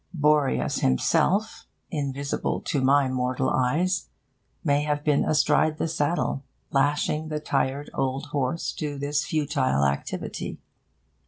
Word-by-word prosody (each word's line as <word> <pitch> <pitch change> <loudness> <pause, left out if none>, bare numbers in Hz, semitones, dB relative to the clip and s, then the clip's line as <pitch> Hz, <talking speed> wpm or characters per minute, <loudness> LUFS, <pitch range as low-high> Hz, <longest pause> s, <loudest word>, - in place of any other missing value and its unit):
Boreas 150 -2 +2
himself, 195 - +1 0.2
invisible 140 -3 -2
to 140 - -1
my 135 +1 +4
mortal 130 0 0
eyes, 165 +9 +1 0.5
may 145 -3 +2
have 150 0 -1
been 150 -2 +3
astride 155 +1 +2
the - - -1
saddle, 150 -2 -1 0.3
lashing 145 +2 +1
the 155 -1 -2
tired 140 -1 -1
old 135 +2 -1
horse 140 +3 -1
to 145 -2 -4
this 145 +1 0
futile 145 - +1
activity. 70 0 -3
145 Hz, 115 wpm, -26 LUFS, 135-150 Hz, 0.5 s, my